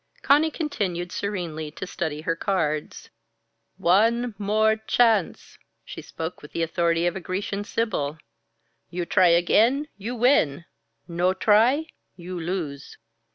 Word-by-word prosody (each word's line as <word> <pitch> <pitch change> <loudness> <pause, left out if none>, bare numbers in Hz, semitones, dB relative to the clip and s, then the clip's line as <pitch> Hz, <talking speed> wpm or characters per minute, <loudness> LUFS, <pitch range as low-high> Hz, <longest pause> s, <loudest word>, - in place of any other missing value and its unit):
Conny 295 +3 +4
continued 190 - -3
serenely 170 -6 -4
to 160 - -7
study 160 -4 -4
her 165 +1 -1
cards. 165 -5 -2 0.7
"One 230 +6 +2
More 215 +2 +2
Chance!" 220 -3 +1 0.3
She - - -8
spoke 165 +2 -7
with 150 - -13
the 165 - -1
authority 170 0 +1
of 175 - 0
a - - -3
Grecian 195 +3 -3
sibyl. 195 -10 -2 0.7
"You 175 0 -3
try 185 +1 +4
again, 225 - +3
you 230 +5 -4
win. 175 - +2 0.4
No 180 +2 0
try, 230 +10 +3 0.3
you 180 0 -7
lose." 160 -5 -5
185 Hz, 125 wpm, -24 LUFS, 170-220 Hz, 0.7 s, Conny